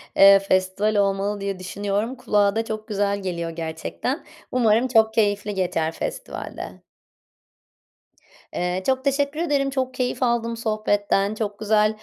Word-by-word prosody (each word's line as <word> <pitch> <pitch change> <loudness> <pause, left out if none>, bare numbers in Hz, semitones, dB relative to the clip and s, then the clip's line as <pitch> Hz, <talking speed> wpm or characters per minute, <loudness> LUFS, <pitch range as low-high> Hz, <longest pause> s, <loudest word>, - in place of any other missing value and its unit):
eee, 195 0 +8
festival 195 +2 +1
olmalı 200 0 +1
diye 195 -1 -3
düşünüyorum. 205 +5 -2
Kulağa 205 -5 +2
da 225 0 0
çok 215 -1 -5
güzel 200 -1 0
geliyor 170 -3 -3
gerçekten. 165 - -4 0.3
Umarım 235 0 +3
çok 220 -3 +4
keyifli 205 -1 +1
geçer 175 -4 0
festival - - -6
de. - - -8 1.7
Eee, 180 +1 -1
çok 260 0 +1
teşekkür 280 +2 0
ederim, 285 -5 +1
çok 260 -1 -2
keyif 255 +1 -1
aldım 235 -1 0
sohbetten. 210 -2 0
Çok 205 -2 -4
güzel, 215 0 +3
210 Hz, 135 wpm, -23 LUFS, 195-235 Hz, 1.7 s, eee